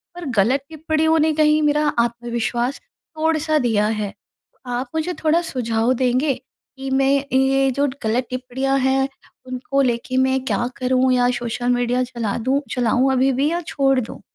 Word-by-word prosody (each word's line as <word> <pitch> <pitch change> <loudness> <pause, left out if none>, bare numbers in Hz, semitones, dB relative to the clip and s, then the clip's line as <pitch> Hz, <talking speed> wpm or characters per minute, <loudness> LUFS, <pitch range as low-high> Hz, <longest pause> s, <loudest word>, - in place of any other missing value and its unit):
पर 350 - -7
गलत 255 +8 +3
टिप्पणियों 315 0 +1
ने 315 +1 +3
कहीं 305 0 +3
मेरा 300 0 +2
आत्मविश्वास 235 +1 -1 0.4
तोड़-सा 310 0 +1
दिया 220 -4 +1
है। 210 -2 -2 0.5
आप 245 +1 -2
मुझे 335 +3 -1
थोड़ा 320 +2 +3
सुझाव 240 -5 0
देंगे 255 +3 +1 0.5
कि 270 - -4
मैं 270 0 +2 0.3
ए 260 - +4
ये 270 0 +3
जो 285 +2 +1 0.2
गलत 235 +3 0
टिप्पणियाँ 260 +2 -1
हैं 265 +1 +2 0.4
उनको 255 +2 -1
लेके 255 0 -1
मैं 265 0 +2
क्या 245 - 0
करूँ 255 0 +2
या 245 0 +3
सोशल 240 +1 -3
मीडिया 245 +1 +1
चला 235 -4 -3
दूँ 260 +4 0
चलाऊँ 250 +2 +2
अभी 265 +1 +3
भी 275 +4 +1
या 345 - -1
छोड़ 270 -2 +2
दूँ? 220 - -9
260 Hz, 165 wpm, -21 LUFS, 245-280 Hz, 0.5 s, ए